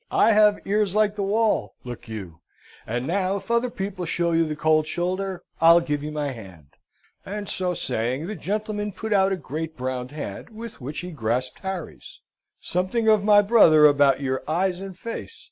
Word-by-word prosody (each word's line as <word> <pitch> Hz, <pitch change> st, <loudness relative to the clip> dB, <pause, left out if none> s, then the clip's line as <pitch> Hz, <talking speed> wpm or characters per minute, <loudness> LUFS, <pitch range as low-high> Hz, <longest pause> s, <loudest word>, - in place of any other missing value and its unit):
I -, -, +4 dB
have 210 Hz, -1 st, +5 dB
ears 205 Hz, -1 st, +1 dB
like 210 Hz, -1 st, +3 dB
the 205 Hz, -, -3 dB
wall, 215 Hz, +2 st, +1 dB
look 120 Hz, -1 st, -8 dB
you. 95 Hz, -7 st, -8 dB, 0.5 s
And, 120 Hz, +3 st, -2 dB
now, 185 Hz, +4 st, 0 dB
if 200 Hz, -, -7 dB
other 235 Hz, +1 st, +2 dB
people 195 Hz, -5 st, -5 dB
show 170 Hz, 0 st, 0 dB
you 165 Hz, 0 st, +2 dB
the 155 Hz, -, -3 dB
cold 155 Hz, 0 st, +2 dB
shoulder, 185 Hz, +2 st, -3 dB, 0.2 s
I'll 165 Hz, +1 st, +8 dB
give 150 Hz, -4 st, -2 dB
you 150 Hz, +1 st, -5 dB
my 150 Hz, -2 st, -2 dB
hand;" 95 Hz, -, -12 dB, 0.5 s
and 205 Hz, +1 st, -6 dB
so 180 Hz, -2 st, -2 dB
saying, 125 Hz, +5 st, -2 dB
the 210 Hz, -, -4 dB
gentleman 210 Hz, +3 st, -3 dB
put 220 Hz, +3 st, -3 dB
out 195 Hz, -1 st, +3 dB
a 190 Hz, -, 0 dB
great 160 Hz, 0 st, -6 dB
brown 125 Hz, 0 st, -3 dB
hand, 145 Hz, -9 st, -7 dB
with 225 Hz, -5 st, -10 dB
which 145 Hz, +7 st, -5 dB
he 180 Hz, 0 st, -7 dB
grasped 125 Hz, -2 st, -2 dB
Harry's. 190 Hz, -4 st, -7 dB, 0.4 s
"Something 190 Hz, +6 st, -1 dB
of 215 Hz, -2 st, +5 dB
my 205 Hz, 0 st, +6 dB
brother 180 Hz, -8 st, +6 dB
about 140 Hz, -2 st, +4 dB
your 130 Hz, -1 st, -1 dB
eyes 180 Hz, +3 st, 0 dB
and 195 Hz, -2 st, -8 dB
face. 230 Hz, -, -7 dB
175 Hz, 185 wpm, -24 LUFS, 145-205 Hz, 0.5 s, I'll